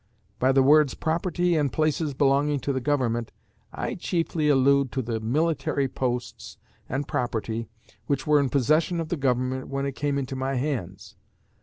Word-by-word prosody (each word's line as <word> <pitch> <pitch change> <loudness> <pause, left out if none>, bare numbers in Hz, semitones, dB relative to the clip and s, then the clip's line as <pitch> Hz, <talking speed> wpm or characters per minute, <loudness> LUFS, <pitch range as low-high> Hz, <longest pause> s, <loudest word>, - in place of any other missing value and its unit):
By 130 +1 +3
the 135 0 +4
words 150 0 +5
"property 175 +2 0
and 145 -4 +1
places 155 -2 0
belonging 140 +1 +2
to 140 - -1
the 130 - -2
Government," 120 -5 0 0.4
I - - -3
chiefly 165 -3 -1
allude 140 -1 +3
to 130 - -1
the 115 -1 -2
military 140 +3 0
posts 125 -1 -4 0.3
and 135 +3 -2
property 115 -4 -2 0.4
which 140 - -1
were 150 -1 +4
in 140 -2 +1
possession 155 +7 +2
of 165 -1 -4
the 175 - 0
Government 130 -2 -1
when 135 0 -2
it 140 - -1
came 145 +1 -2
into 135 -1 -3
my 135 +1 -2
hands. 125 - -4
140 Hz, 165 wpm, -25 LUFS, 130-150 Hz, 0.4 s, words